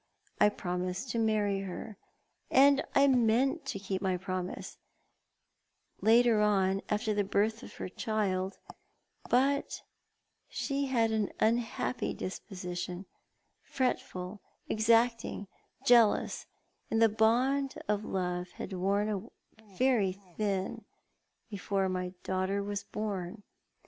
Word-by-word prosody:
I 210 - +6
promised 180 +4 -3
to 230 - -1
marry 210 -3 +1
her, 195 +2 -6 0.5
and 280 +1 +6
I 275 - +6
meant 260 +4 +2
to 270 - -2
keep 195 -1 -3
my 185 -2 0
promise, 185 0 -5 1.2
later 230 -1 +5
on, 195 -2 +2
after 210 +1 0
the 205 0 +1
birth 210 +3 0
of - - -11
her - - -5
child; 195 -2 -1 0.7
but 275 +3 +1 0.7
she 280 0 -2
had 230 -4 +2
an 215 -2 0
unhappy 235 +2 0
disposition, 180 -1 -5 0.6
fretful, 200 -6 -3 0.3
exact 230 +1 +3
ing, 200 - -6 0.4
jealous, 235 -3 +4 0.4
and 225 - +1
the 225 - +7
bond 245 +6 +2
of 210 0 0
love 180 -2 -2
had - - -7
worn 200 +3 0 0.5
very 240 -8 +3 0.2
thin 200 +1 -2 0.6
before 200 -2 -1
my 180 0 -3
•daughter 190 +2 -1
was 205 0 -3
born. 205 -1 -4
210 Hz, 110 wpm, -31 LUFS, 190-230 Hz, 1.2 s, the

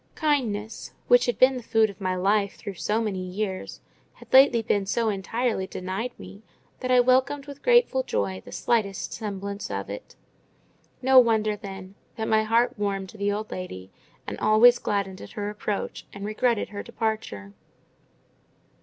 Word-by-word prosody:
Kindness, 230 -9 -1
which 245 0 +5
had 245 - 0
been 260 0 +5
the - - -5
food 225 -2 +2
of 200 - -19
my 185 -1 0
life 200 +2 +1
through 200 - -7
so 210 +4 -1
many 210 -4 -2
years, 190 +1 -4 0.3
had - - -17
lately 260 -3 +7
been 205 -3 0
so 230 +2 +1
entirely 215 +1 -1
denied 190 +6 -4
me, 200 - -11 0.4
that 255 - -4
I 250 0 +5
welcomed 260 +3 +2
with 285 -1 -10
grateful 480 - +4
joy 95 - -2
the - - -12
slightest 200 - -1
semblance 200 -1 -5
of 100 0 -4
it. 100 - -9 0.9
No 260 0 +7
wonder, 220 -3 +3
then, 195 -2 -9 0.2
that 220 0 -3
my 220 0 +3
heart 230 +2 +1
warmed 195 -2 -2
to 220 - -13
the 200 0 +1
old 215 +1 -4
lady, 95 - -7 0.3
and - - -6
always 240 +3 +6
gladdened 195 -2 -2
at - - -11
her 205 -2 -3
approach 210 -1 -4
and 200 0 -7
regretted 215 +1 0
her 205 -1 -6
departure. 215 - -4
215 Hz, 165 wpm, -25 LUFS, 195-240 Hz, 0.9 s, lately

